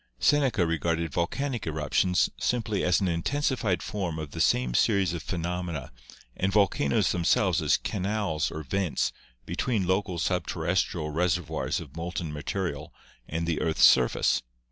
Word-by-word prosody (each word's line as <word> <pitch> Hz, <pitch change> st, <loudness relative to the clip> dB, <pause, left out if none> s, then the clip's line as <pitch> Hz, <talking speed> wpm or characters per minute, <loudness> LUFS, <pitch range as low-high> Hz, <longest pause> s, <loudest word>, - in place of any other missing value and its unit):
Seneca 130 Hz, -, +3 dB
regarded 85 Hz, 0 st, -1 dB
volcanic 120 Hz, +6 st, -2 dB
eruptions 80 Hz, +4 st, +1 dB
simply 110 Hz, -4 st, -1 dB
as 90 Hz, -1 st, +3 dB
an 95 Hz, -, +1 dB
intensi 130 Hz, -, 0 dB
fied 95 Hz, -9 st, -1 dB
form 90 Hz, -6 st, -3 dB
of 75 Hz, -2 st, -6 dB
the -, -, -3 dB
same 60 Hz, -1 st, +2 dB
series 100 Hz, -, +2 dB
of 85 Hz, -, -4 dB
phenomena 85 Hz, -4 st, -4 dB, 0.4 s
and 95 Hz, +1 st, 0 dB
volcanoes 95 Hz, -9 st, +2 dB
themselves 90 Hz, 0 st, +2 dB
as 75 Hz, -2 st, +3 dB
canals 100 Hz, -5 st, -1 dB
or 80 Hz, -, -6 dB
vents 90 Hz, +3 st, 0 dB, 0.3 s
between 95 Hz, +4 st, -1 dB
local 95 Hz, 0 st, 0 dB
sub 90 Hz, +2 st, 0 dB
terrestrial 85 Hz, -2 st, -1 dB
reservoirs 85 Hz, +1 st, -1 dB
of 75 Hz, -3 st, -11 dB
molten 85 Hz, -2 st, -4 dB
material 85 Hz, +4 st, -4 dB, 0.4 s
and 85 Hz, +2 st, -2 dB
the 85 Hz, -2 st, -1 dB
earth's 80 Hz, -1 st, +1 dB
surface. 65 Hz, -2 st, +4 dB
85 Hz, 145 wpm, -27 LUFS, 80-95 Hz, 0.4 s, surface